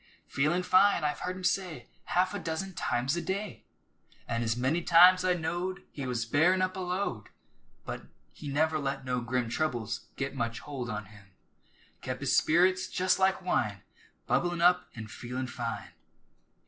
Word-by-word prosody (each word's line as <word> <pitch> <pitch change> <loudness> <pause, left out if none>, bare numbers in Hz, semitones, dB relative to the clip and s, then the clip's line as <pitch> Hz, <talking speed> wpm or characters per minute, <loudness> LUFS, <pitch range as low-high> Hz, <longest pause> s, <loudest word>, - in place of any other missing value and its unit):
"Feelin' 155 +6 +1
fine," 185 -1 +4
I've 150 0 -1
heard 180 0 -3
him 185 - -9
say 180 -9 -1 0.2
Half 185 +2 +1
a 205 - -3
dozen 175 +3 -4
times 135 -4 0
a 170 - -2
day, 200 +3 -4 0.6
An' 115 0 -1
as 115 0 0
many 135 +8 +1
times 180 +2 +7
I 180 -1 +3
knowed 175 +3 -3
He 140 -3 -5
was 120 -2 -1
bearin' 175 +10 +3
up 185 0 -1
a - - -5
load. 180 - -3 0.6
But - - -6 0.3
he 150 - -9
never 155 +3 +1
let 135 -1 -3
no 125 -1 -1
grim 120 0 -1
Troubles 120 -4 -2
git 135 0 -3
much 115 -4 -2
holt 130 -4 -5
on 105 0 -4
him, 100 0 -16 0.8
Kep' - - -5
his - - +2
spirits 185 +3 +3
jest 185 +1 +1
like 190 0 +2
wine, 105 - -1 0.4
Bubblin' 175 -1 0
up 180 +1 +4
an' 115 -2 -6
"feelin' 125 +4 -5
fine!" 120 -2 -5
155 Hz, 170 wpm, -30 LUFS, 125-180 Hz, 0.8 s, times